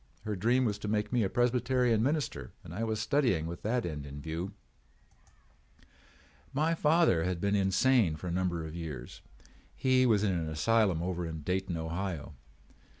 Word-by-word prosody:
Her 105 -1 -2
dream 120 +7 +2
was 105 -3 -1
to 105 - -5
make 105 +1 -1
me 120 - +3
a 100 - +1
Presbyterian 125 -1 +2
minister 140 - -1
and 80 - -9
I 105 +6 -3
was 110 -1 -1
studying 110 - +1
with 85 +1 -6
that 120 +3 0
end 75 -4 -5
in 70 +1 -8
view. 80 +6 -4 2.0
"My 155 +4 +1
father 160 - +3
had 90 -1 -1
been 100 +2 +1
insane 100 -1 +3
for 75 - -9
a 90 - -2
number 85 -2 -1
of 80 - -7
years. 75 -7 -7 0.5
He 130 -1 +3
was 105 -3 +3
in 100 - +2
an 85 -3 -2
asylum 90 +2 +2
over 90 -1 -2
at 80 -2 -7
Dayton, 95 -1 -1
Ohio. 80 -2 -4
100 Hz, 170 wpm, -31 LUFS, 85-120 Hz, 2.0 s, me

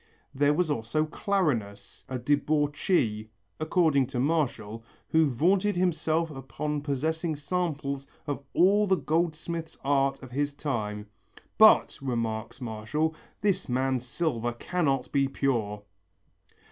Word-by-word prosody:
There 145 +2 +3
was 170 -2 +1
also 145 +4 0
Clarinus, 120 - -2
a 130 - -2
debauchee, 145 - +1 0.3
according 155 -4 +2
to 130 -2 -3
Martial, 125 -7 -1 0.3
who 160 -2 +4
vaunted 185 - +2
himself 165 -2 +1
upon 145 +2 -4
possessing 155 +3 -1
samples 145 -3 -2 0.2
of 145 -1 -3
all 205 +4 +5
the 190 - +4
goldsmith's 160 +2 -2
art 135 -1 +1
of 130 - -10
his 145 +2 -1
time. 105 -8 -3 0.5
"But," - - +6
remarks 115 -2 -3
Martial, 125 +7 -2 0.3
"this 195 -6 0
man's 130 0 0
silver 120 -3 -1
cannot 135 -1 -1
be 140 -1 +2
pure!" 115 -7 -1
145 Hz, 115 wpm, -28 LUFS, 125-160 Hz, 0.5 s, But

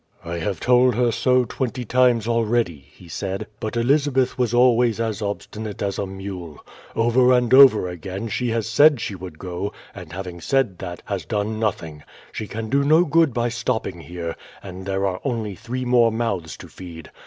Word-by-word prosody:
"I 85 0 -4
have 95 +3 -3
told 125 -1 +4
her 120 0 +2
so 125 +2 +2
twenty 125 0 -4
times 120 -2 +3
already," 115 - 0
he 90 - -16
said; 95 +3 -4
"but 110 +2 -4
Elizabeth 135 +1 +2
was 125 -3 0
always 120 -2 +3
as 110 -2 -2
obstinate 105 0 -5
as 100 -1 -2
a 100 - -2
mule. 95 -5 -7 0.4
Over 120 +2 +4
and 125 -1 +2
over 130 -8 +7
again 95 +4 -6
she 120 +3 -2
has 115 -1 -1
said 145 +4 +5
she 105 - -4
would 90 -4 -9
go; 90 +3 -4 0.2
and 90 -5 -10
having 90 -1 -7
said 125 -5 0
that, 90 -2 -7
has 100 -4 -3
done 105 +4 -2
nothing. 80 -8 -3 0.3
She 110 - -5
can 110 +1 -5
do 140 +5 +2
no 155 +5 +5
good 165 -1 +3
by 120 0 0
stopping 120 -6 -3
here; 85 +1 -6 0.3
and 95 0 -9
there 95 0 0
are 95 -1 -2
only 115 -6 -2
three 120 +6 -5
more 120 -2 +4
mouths 105 -8 -3
to - - -11
feed. 85 -3 -11
110 Hz, 185 wpm, -22 LUFS, 95-125 Hz, 0.4 s, over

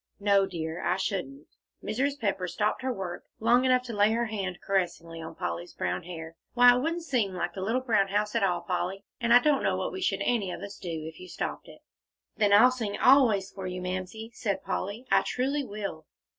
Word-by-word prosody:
"No, 200 -1 +3
dear, 160 -2 -4
I 180 - +1
shouldn't." 180 -8 -3 0.4
Mrs. 275 +6 -1
Pepper 195 -5 -1
stopped 210 +7 -1
her 260 0 -1
work 190 -6 -5 0.2
long 240 +3 +4
enough 255 -1 +4
to 240 -2 -6
lay 210 +1 +3
her 235 +1 +1
hand 195 -5 -3
caressingly 170 -4 -2
on 160 - -8
Polly's 175 -1 -4
brown - - -2
hair. 165 -2 -8 0.2
"Why, 245 0 +8
it - - +1
wouldn't 330 +5 -2
seem 235 - 0
like 175 -1 -2
the 190 - -6
little 225 +7 0
brown 215 -6 +2
house 210 +2 0
at 230 - +1
all, 190 -3 +1
Polly, 185 +1 -3
and 235 -1 0
I 240 - +10
don't 285 +2 +3
know - - +1
what - - -2
we 380 - -6
should 370 - 0
any 225 -6 +1
of - - -6
us 200 0 -8
do, 165 -4 -5
if 160 0 -9
you 185 - -10
stopped - - -5
it." - - -14 0.5
"Then 205 -2 +2
I'll 225 +5 +7
sing 225 -5 -3
always 235 -8 +5
for 190 -2 -6
you, 180 0 -4
Mamsie," 185 +5 -5
said 205 -5 -2
Polly; 205 +6 -3
"I - - +6
truly 275 +3 -1
will." 200 - -6
200 Hz, 215 wpm, -28 LUFS, 180-240 Hz, 0.5 s, I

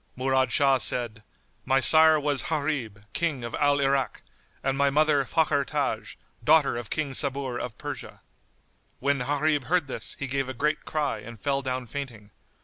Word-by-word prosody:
Murad 130 0 +1
Shah 135 -3 +4
said, 120 -4 0 0.4
"My 135 0 +2
sire 155 +2 +6
was 145 -2 0
Gharib, 140 -10 -2
King 150 -7 -1
of 120 - -6
Al 145 0 +3
Irak, 135 -1 0 0.4
and 135 0 0
my 140 0 +3
mother 150 -1 +3
Fakhr 150 -2 +2
Taj, - - -3 0.3
daughter 145 +2 +4
of 120 -2 -6
King 155 -3 -2
Sabur 135 -3 0
of 120 -4 -6
Persia." - - -7 0.8
When 140 +1 +1
Gharib 145 +1 0
heard 175 -2 +1
this, 135 - -4
he 140 - -3
gave 135 0 -2
a 130 - -5
great 150 +4 -1
cry 150 -8 -1
and 110 +1 -11
fell 140 +6 0
down 130 -1 -3
fainting. 120 -5 -7
140 Hz, 165 wpm, -26 LUFS, 125-145 Hz, 0.8 s, sire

